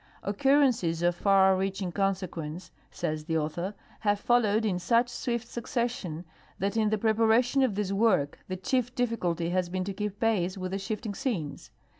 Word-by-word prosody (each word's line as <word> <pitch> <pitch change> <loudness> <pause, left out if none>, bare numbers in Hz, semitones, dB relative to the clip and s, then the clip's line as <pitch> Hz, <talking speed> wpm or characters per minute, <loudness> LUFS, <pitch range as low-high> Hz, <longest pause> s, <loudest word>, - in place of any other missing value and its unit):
'' - - -28
" - - -35
Occur 275 +7 +4
rences 175 -10 +1
of 175 - +1
far 190 0 +4
reaching 190 -1 -2
consequence," 185 -3 -3 0.2
says 155 0 -3
the 160 -1 0
author, 170 +6 -3
" - - -27
have 205 -1 +1
followed 220 -2 +2
in 190 -4 +1
«uch 230 +7 +2
swift 235 -1 -3
succession 235 -9 -3 0.3
that 200 +3 -1
in 220 -2 +2
the 215 - +1
preparation 225 +4 +3
of 250 -7 +2
this 205 -1 -1
work 195 -9 +2
the 185 - -4
chief 245 +5 -1
dilli 240 -2 0
culty 170 -2 -1
has 180 -1 0
been 185 +1 -2
to 195 +1 -4
keej) 210 0 -3
i)ace 195 -5 +1
with 185 -1 -4
the 195 - -2
shifting 210 +1 -4
scenes. 190 - -3
200 Hz, 190 wpm, -28 LUFS, 180-230 Hz, 0.3 s, Occur